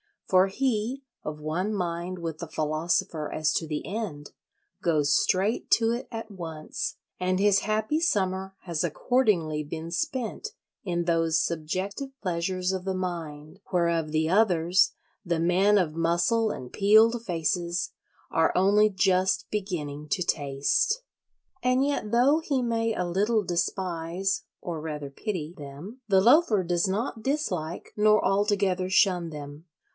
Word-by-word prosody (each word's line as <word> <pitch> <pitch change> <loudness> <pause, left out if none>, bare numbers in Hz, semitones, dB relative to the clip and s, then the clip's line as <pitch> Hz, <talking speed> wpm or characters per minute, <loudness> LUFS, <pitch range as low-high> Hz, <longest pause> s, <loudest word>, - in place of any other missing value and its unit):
For 185 0 +5
he, 250 +4 -1 0.2
of 150 0 -5
one 175 +8 -1
mind 175 0 -3
with 165 -2 -5
the 170 - -5
philosopher 155 +1 -1
as 155 -1 0
to 160 - -1
the 150 -1 -3
end, 185 -9 -5 0.5
goes 150 -4 +2
straight 195 +5 +1
to 225 -1 +4
it 240 +2 -3
at 225 -2 -7
once; 165 -5 -5 0.2
and 185 0 +1
his 200 0 +4
happy 215 +8 0
summer 190 - 0
has 170 -3 -2
accordingly 175 - +1
been 160 +2 -6
spent 255 - -3 0.3
in 175 -2 -1
those 165 -1 +2
subjective 190 - -3
pleasures 180 0 -1
of 190 -1 -3
the 190 -1 -1
mind 165 -3 -5
whereof 170 -3 +1
the 160 +1 +1
others, 185 -2 +3 0.3
the 170 -4 -1
men 185 +5 +4
of 165 -5 0
muscle 170 +7 +2
and 125 -11 -6
peeled 220 +3 +5
faces, 170 -1 -1 0.4
are 160 0 +2
only 205 +3 +4
just 185 -1 +2
beginning 155 -8 -4
to 180 - +1
taste. 145 - 0 0.6
And 255 +2 +2
yet 280 -7 -1
though 260 +6 +4
he 280 -5 -1
may 230 -1 0
a 180 - -1
little 205 +5 +1
despise 180 +2 -1 0.2
(or 170 -3 -4
rather 150 -3 -5
pity) 170 -1 -4
them, 150 - -9
the 190 -2 +4
Loafer 235 - +5
does 175 +1 +1
not 220 +4 -2
dislike 185 - -2
nor 215 0 +4
altogether 195 -2 +1
shun 180 -3 +3
them. 145 +1 -9
185 Hz, 140 wpm, -27 LUFS, 165-210 Hz, 0.6 s, For